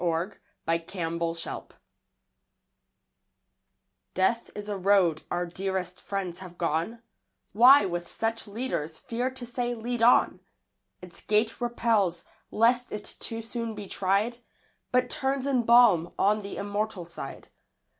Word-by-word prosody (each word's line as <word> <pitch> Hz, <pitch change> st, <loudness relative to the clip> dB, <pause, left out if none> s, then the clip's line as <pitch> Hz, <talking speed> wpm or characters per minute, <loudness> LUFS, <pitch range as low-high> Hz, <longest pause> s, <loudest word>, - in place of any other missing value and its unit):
James 170 Hz, +3 st, 0 dB, 0.3 s
Leigh 165 Hz, 0 st, +1 dB
Hunt 170 Hz, -2 st, -2 dB
Death -, -, -7 dB, 2.4 s
DEATH 230 Hz, +5 st, +1 dB
is 205 Hz, 0 st, -6 dB
a 205 Hz, -, -2 dB
road 190 Hz, -4 st, +3 dB
our 175 Hz, 0 st, -1 dB
dearest 185 Hz, 0 st, -4 dB
friends 190 Hz, -3 st, -4 dB
have 180 Hz, -2 st, -11 dB
gone; 170 Hz, +8 st, -1 dB, 0.5 s
Why 250 Hz, +4 st, +8 dB
with 175 Hz, -2 st, -3 dB
such 225 Hz, +2 st, -3 dB
leaders, 200 Hz, -8 st, -3 dB
fear 245 Hz, +2 st, -2 dB
to 260 Hz, -1 st, -8 dB
say, 240 Hz, 0 st, -2 dB
"Lead 240 Hz, +1 st, -3 dB
on?" 240 Hz, +2 st, +5 dB, 0.6 s
Its 175 Hz, -2 st, -11 dB
gate 215 Hz, +3 st, +1 dB
repels, 225 Hz, -7 st, +1 dB, 0.2 s
lest 240 Hz, +3 st, +2 dB
it 210 Hz, 0 st, -6 dB
too 225 Hz, 0 st, -4 dB
soon 230 Hz, -1 st, -4 dB
be 210 Hz, -1 st, -7 dB
tried, 200 Hz, +5 st, 0 dB, 0.5 s
But 250 Hz, 0 st, +3 dB
turns 265 Hz, +1 st, -1 dB
in 260 Hz, -4 st, +1 dB
balm 225 Hz, -9 st, +5 dB
on 210 Hz, +2 st, +3 dB
the 200 Hz, 0 st, -7 dB
immortal 205 Hz, -2 st, -3 dB
side. 165 Hz, -5 st, -8 dB
205 Hz, 130 wpm, -28 LUFS, 175-235 Hz, 2.4 s, Why